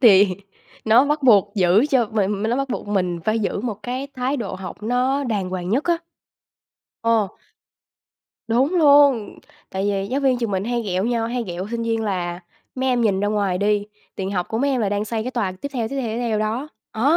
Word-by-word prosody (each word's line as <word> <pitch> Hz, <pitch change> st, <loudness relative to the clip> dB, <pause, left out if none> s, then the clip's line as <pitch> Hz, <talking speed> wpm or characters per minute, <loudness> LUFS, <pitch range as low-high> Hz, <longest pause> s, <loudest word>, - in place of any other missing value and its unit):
thì 205 Hz, -5 st, +7 dB, 0.6 s
nó 225 Hz, +4 st, +6 dB
bắt 295 Hz, +1 st, 0 dB
buộc 205 Hz, -5 st, +5 dB
giữ 195 Hz, +5 st, +4 dB
cho 250 Hz, -4 st, +3 dB
mình 205 Hz, -1 st, -1 dB
mình 220 Hz, -, 0 dB
nó 240 Hz, -, +1 dB
bắt 275 Hz, 0 st, -1 dB
buộc 245 Hz, -, -4 dB
mình 180 Hz, -4 st, -1 dB
phải 215 Hz, +1 st, +1 dB
giữ 205 Hz, -2 st, -1 dB
một 215 Hz, -3 st, -4 dB
cái 255 Hz, +5 st, -3 dB
thái 255 Hz, +3 st, -1 dB
độ 220 Hz, -7 st, -4 dB
học 185 Hz, +2 st, -8 dB
nó 255 Hz, +5 st, +1 dB
đàng 205 Hz, -7 st, -2 dB
hoàng 180 Hz, -1 st, -4 dB
nhất 260 Hz, +8 st, +1 dB
á. 345 Hz, -1 st, +2 dB, 1.1 s
Ồ. 230 Hz, -3 st, +2 dB, 1.2 s
Đúng 260 Hz, +9 st, +2 dB
luôn. 285 Hz, -, +5 dB, 0.3 s
Tại 190 Hz, +1 st, -2 dB
vì 195 Hz, -1 st, -1 dB
giáo 270 Hz, +3 st, -1 dB
viên 265 Hz, -3 st, +2 dB
trường 230 Hz, -3 st, -2 dB
mình 190 Hz, 0 st, -1 dB
hay 240 Hz, +1 st, -1 dB
ghẹo 190 Hz, -2 st, -1 dB
nhau, 230 Hz, -1 st, 0 dB
hay 240 Hz, +1 st, -2 dB
ghẹo 180 Hz, -1 st, -5 dB
sinh 235 Hz, 0 st, -2 dB
viên 225 Hz, -1 st, -1 dB
là 180 Hz, -4 st, -2 dB, 0.3 s
"Mấy 260 Hz, 0 st, -1 dB
em 250 Hz, -1 st, +2 dB
nhìn 200 Hz, -4 st, +2 dB
ra 205 Hz, -, +1 dB
ngoài 200 Hz, -3 st, 0 dB
đi, 205 Hz, 0 st, +1 dB, 0.3 s
tiền 190 Hz, 0 st, -3 dB
học 180 Hz, -3 st, -2 dB
của 225 Hz, -, -2 dB
mấy 280 Hz, +3 st, +1 dB
em 260 Hz, -2 st, 0 dB
là 210 Hz, -, +1 dB
đang 205 Hz, +1 st, -1 dB
xây 220 Hz, 0 st, -2 dB
cái 255 Hz, -, -3 dB
tòa 220 Hz, -7 st, -1 dB
tiếp 185 Hz, +10 st, -6 dB
theo, 235 Hz, -4 st, -2 dB
tiếp 275 Hz, -, -5 dB
theo, 240 Hz, -, -3 dB
tiếp 220 Hz, +1 st, -3 dB
theo 230 Hz, -3 st, 0 dB
đó." 220 Hz, +7 st, -2 dB, 0.2 s
Á, 220 Hz, -, -4 dB
220 Hz, 225 wpm, -22 LUFS, 200-250 Hz, 1.2 s, thì